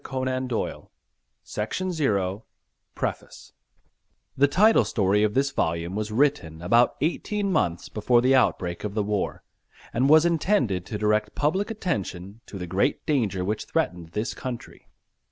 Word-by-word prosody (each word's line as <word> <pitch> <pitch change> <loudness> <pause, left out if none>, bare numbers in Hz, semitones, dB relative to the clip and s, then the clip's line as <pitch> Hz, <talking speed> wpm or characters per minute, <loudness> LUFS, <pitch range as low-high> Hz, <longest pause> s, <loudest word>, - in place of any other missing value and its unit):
1918 130 -2 -2
ALL - - -17 0.7
RIGHTS 105 +10 -2
RESERVED 110 - 0 0.5
PREFACE - - -5 0.8
The 140 +2 +4
Title 210 +10 +5
story 100 -1 +1
of 105 0 +1
this 140 +1 +2
volume 85 -2 -1
was 105 0 -3
written 115 - +1
about 115 +7 +4
eighteen 200 +6 -1
months 85 - 0
before 120 +3 +2
the 130 +2 +3
outbreak 90 -9 +1
of 105 -1 -4
the 105 - +1
war, 105 -1 -2 0.5
and 130 +4 +2
was 160 +2 +7
intended 150 - +1
to 105 - -4
direct 105 0 0
public 185 +9 0
attention 105 - -4
to 100 - -8
the 90 - -5
great 95 +3 0
danger 110 - 0
which 105 +2 -2
threatened 85 -2 -2
this 105 +3 -2
country. 125 -2 -8
110 Hz, 145 wpm, -25 LUFS, 100-140 Hz, 0.8 s, was